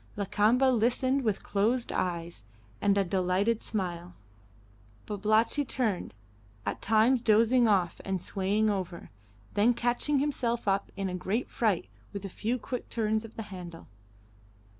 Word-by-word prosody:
Lakamba 210 +5 +2
listened 255 +3 +2
with 215 -5 -1
closed 230 +5 0
eyes 170 - -3 0.4
and 200 0 +3
a 200 - +4
delighted 190 +4 +1
smile; 175 -4 -4 0.9
Babalatchi 215 +6 +1
turned, 225 - -2 0.5
at 100 - -3
times 225 +4 +3
dozing 230 +2 +4
off 190 -5 +1
and 190 -1 -2
swaying 200 +4 0
over, 190 -4 -3 0.4
then 230 +4 +3
catching 245 +5 0
himself 250 -5 -1
up 195 0 +1
in 195 -1 -1
a 185 - -4
great 195 +7 -2
fright 215 -8 0 0.3
with 200 -1 -5
a - - -4
few 225 +6 -2
quick 250 +1 -6
turns 220 -1 0
of 225 0 -11
the 225 - -5
handle. 175 -2 -9
215 Hz, 140 wpm, -29 LUFS, 190-235 Hz, 0.9 s, a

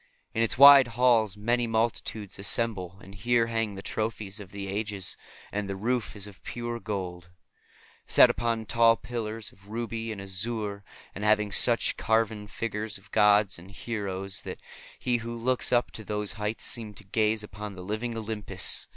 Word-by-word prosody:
In 115 - 0
its 115 - +1
wide 140 -1 +10
halls 115 -5 +4
may 120 +3 +1
multitudes 110 -3 -2
assemble, 100 -3 -1
and 95 - -12
here 120 +3 +2
hang 115 -3 -2
the 95 - -8
trophies 110 -2 -3
of 100 -3 -10
the 100 0 -6
ages. 100 -3 -2 0.4
And 100 -1 -3
the 95 - -2
roof 115 +1 -1
is 100 -1 -3
of 100 -3 -13
pure 120 0 -5
gold, 90 -5 -5 0.8
set - - +8
upon 115 -1 -1
tall 115 +1 +5
pillars 115 -3 -5
of 100 +1 -22
ruby 115 +1 -4
and 105 - -6
azure, 100 +1 -3 0.3
and 100 - -6
having 105 -1 +3
such 115 +3 +4
carven 110 -2 0
figures 110 -1 -3
of 95 - -19
gods 105 -3 +4
and 90 +3 -13
heroes 100 -2 -4
that - - -7 0.4
he 125 -1 0
who 115 0 -6
looks 125 +2 +1
up 120 -1 +2
to 110 - -8
those 105 0 -2
heights 105 +1 -3
seems 110 -3 -4
to - - -9
gaze 110 +2 +1
upon 105 -1 -7
the 90 - -8
living 110 +4 -3
Olympus. 110 -2 0
110 Hz, 170 wpm, -28 LUFS, 100-115 Hz, 0.8 s, wide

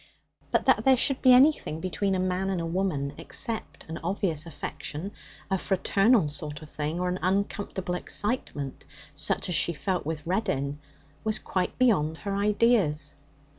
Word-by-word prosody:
But - - +1
that - - +4
there 265 -1 +5
should 265 +2 +2
be 255 - +7
anything 255 - +5
between 185 +3 -1
a - - 0
man 185 +1 0
and 190 -2 -1
a 165 - -2
woman 165 -5 -1
except 230 -4 -2
an 160 +1 -5
obvious 170 -3 -1
affection, 165 +3 -5 0.4
a 190 - +2
fraternal 195 - +3
sort 150 0 -6
of 150 - -13
thing, 155 +3 -3
or 180 - 0
an 180 +1 -1
uncomfortable 190 -1 -1
excitement 180 - -2 0.3
such - - -1
as 180 - -1
she 170 - +3
felt 180 +5 -2
with 155 0 -4
Reddin, 165 -7 -1 0.4
was 215 -1 0
quite 185 -3 -2
beyond 170 -11 +3
her 200 +1 -3
ideas. 200 -8 +2
185 Hz, 160 wpm, -27 LUFS, 155-205 Hz, 0.4 s, be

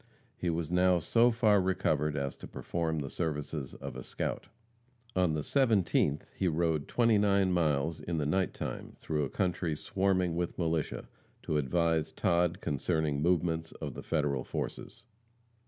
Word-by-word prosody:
He 90 - -2
was 85 -1 -2
now 90 0 +4
so 115 +9 +4
far 110 -4 +4
recovered 75 -5 0
as 70 -1 -2
to - - -9
perform 80 -2 -2
the 70 - -4
services 75 -4 -3
of - - -7
a - - -5
scout. - - -4 0.7
On 90 -4 +2
the 75 - -1
17th 100 - +2
he 95 - 0
rode 80 -2 0
twenty 115 -3 +3
nine 100 -2 +3
miles 80 -2 +1
in 85 -1 -3
the 75 - 0
night 95 +5 +1
time, - - -6
through 75 -2 -2
a - - -5
country 90 -2 -1
swarming 95 -2 0
with 85 0 -2
militia, 80 -3 -1 0.4
to 75 - 0
advise 80 +2 +1
Todd 85 -1 +1
concerning 75 +1 0
the 80 +5 +2
movements 80 -2 0
of 75 -4 -6
the - - -7
Federal 70 -4 0
forces. - - -5
85 Hz, 160 wpm, -31 LUFS, 75-90 Hz, 0.7 s, now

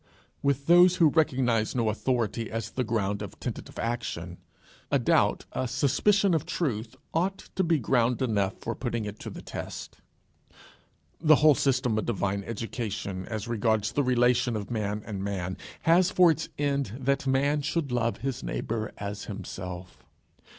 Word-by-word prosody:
With 140 0 0
those 175 +2 +7
who 165 -4 +5
recognize 125 -8 +2
no 115 -3 +1
authority 115 0 -1
as 115 -1 -4
the 130 - -1
ground 105 -3 -1
of 105 - -8
tentative - - -6
action, 90 -7 -3 0.5
a - - +3
doubt, - - +2
a 130 - -2
suspicion 175 - +2
of 160 - +1
truth 115 -9 -2 0.2
ought 185 +4 -1
to 190 - +2
be 165 -2 +3
ground 120 -2 +2
enough 100 -6 0
for 115 - -3
putting 120 -3 -3
it 105 0 -7
to - - -6
the - - -9
test. - - -7 1.2
The 155 -1 +6
whole 150 +1 +6
system 130 -5 +1
of - - -4
divine 100 -3 -1
education 105 -4 -4
as 110 -1 -4
regards 110 -2 +1
the 145 - +1
relation 125 -2 +2
of 105 +1 -5
man 105 -2 -2
and 100 -3 -4
man, 95 -2 -3 0.3
has 175 +2 +5
for 180 -4 +6
its 160 0 -3
end 140 -6 -1
that 140 +1 0
a - - +2
man 140 +3 +2
should 150 -1 -1
love 115 -1 0
his 130 -1 -3
neighbour 110 -1 -3
as 100 0 -5
himself. 90 -3 -7
120 Hz, 165 wpm, -28 LUFS, 105-140 Hz, 1.2 s, those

